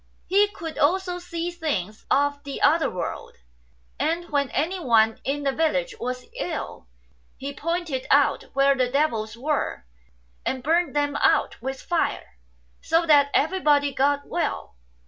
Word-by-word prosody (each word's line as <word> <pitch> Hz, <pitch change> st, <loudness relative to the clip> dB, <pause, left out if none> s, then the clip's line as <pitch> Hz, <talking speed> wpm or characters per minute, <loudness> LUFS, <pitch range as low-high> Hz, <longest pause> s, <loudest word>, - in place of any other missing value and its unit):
He 400 Hz, +3 st, +4 dB
could 330 Hz, -5 st, -8 dB
also 360 Hz, +3 st, +1 dB
see 345 Hz, -1 st, -4 dB
things 225 Hz, -, -4 dB
of 285 Hz, 0 st, +1 dB
the 280 Hz, -2 st, -6 dB
other 320 Hz, +3 st, +4 dB
world; 180 Hz, -, -5 dB, 0.6 s
and 335 Hz, +2 st, -1 dB
when 280 Hz, -2 st, +1 dB
anyone 255 Hz, -10 st, +2 dB
in 285 Hz, +2 st, -2 dB
the 275 Hz, -, +1 dB
village -, -, 0 dB
was 250 Hz, 0 st, -4 dB
ill, 320 Hz, -, -5 dB, 0.5 s
he 280 Hz, +1 st, -5 dB
pointed 330 Hz, -3 st, -3 dB
out 285 Hz, 0 st, +3 dB
where 275 Hz, +1 st, +4 dB
the 255 Hz, -2 st, +1 dB
devils 230 Hz, -6 st, 0 dB
were, 275 Hz, -, -2 dB, 0.6 s
and 260 Hz, -1 st, -2 dB
burnt 325 Hz, 0 st, +1 dB
them 290 Hz, -1 st, 0 dB
out -, -, +2 dB
with 265 Hz, 0 st, -4 dB
fire, 330 Hz, -, -2 dB, 0.4 s
so 330 Hz, +1 st, +2 dB
that 290 Hz, -3 st, +5 dB
everybody 295 Hz, -4 st, +2 dB
got 285 Hz, +1 st, +1 dB
well. -, -, -3 dB
290 Hz, 140 wpm, -24 LUFS, 265-335 Hz, 0.6 s, that